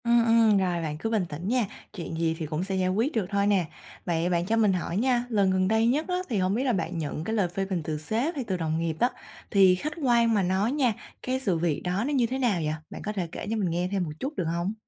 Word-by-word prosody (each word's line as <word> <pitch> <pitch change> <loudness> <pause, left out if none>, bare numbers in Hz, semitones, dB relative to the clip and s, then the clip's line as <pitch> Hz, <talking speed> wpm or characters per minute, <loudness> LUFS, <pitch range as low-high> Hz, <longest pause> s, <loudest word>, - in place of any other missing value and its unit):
Ừm, 235 0 +4
ừm, 225 -2 +5
rồi 180 -3 0
bạn 150 -2 -3
cứ 225 - -3
bình 215 -5 +1
tĩnh 160 +5 -5
nha, 245 0 +2 0.3
chuyện 170 -3 -6
gì 165 -1 +1
thì 160 - -2
cũng 155 +3 -2
sẽ 190 0 -3
giải 185 -1 +1
quyết 225 +10 +1
được 220 -8 0
thôi 200 0 +1
nè. 195 -4 +3 0.4
Vậy 170 0 0
bạn 170 -1 +1
cho 220 +4 +1
mình 210 -3 +4
hỏi 175 0 -2
nha, 245 +1 +2
lần 200 -4 +2
gần 185 0 +2
đây 220 +2 +3
nhất 290 +6 +1
á 360 - 0
thì 225 - 0
hổng 185 0 +1
biết 250 - 0
là 255 -3 +2
bạn 175 -2 -2
nhận 155 -1 -3
cái 220 +6 -2
lời 200 -5 +2
phê 195 +3 -3
bình 190 -3 -2
từ 155 0 -3
sếp 225 - -1
hay 275 - -2
từ 190 -5 -2
đồng 160 -1 -1
nghiệp 165 -1 -1
á 245 - +4 0.4
thì 190 -2 +6
khách 305 +11 -4
quan 235 -3 +4
mà 205 -3 +2
nói 190 +5 +1
nha, 265 -5 +2 0.3
cái 255 +1 -1
sự 195 -10 0
việc 160 -3 0
đó 180 +4 0
nó 295 - -1
như 255 -4 +3
thế 260 +3 -2
nào 230 -10 +1
vậy? 155 0 0 0.2
Bạn - - -8
có 210 - -1
thể 185 -4 -2
kể 195 - -6
cho 225 - 0
mình 195 -5 0
nghe 175 +2 0
thêm 195 -2 0
một 160 - -4
chút 280 +4 -4
được 180 - -1
hông? 175 +4 -1
195 Hz, 295 wpm, -27 LUFS, 175-230 Hz, 0.4 s, thì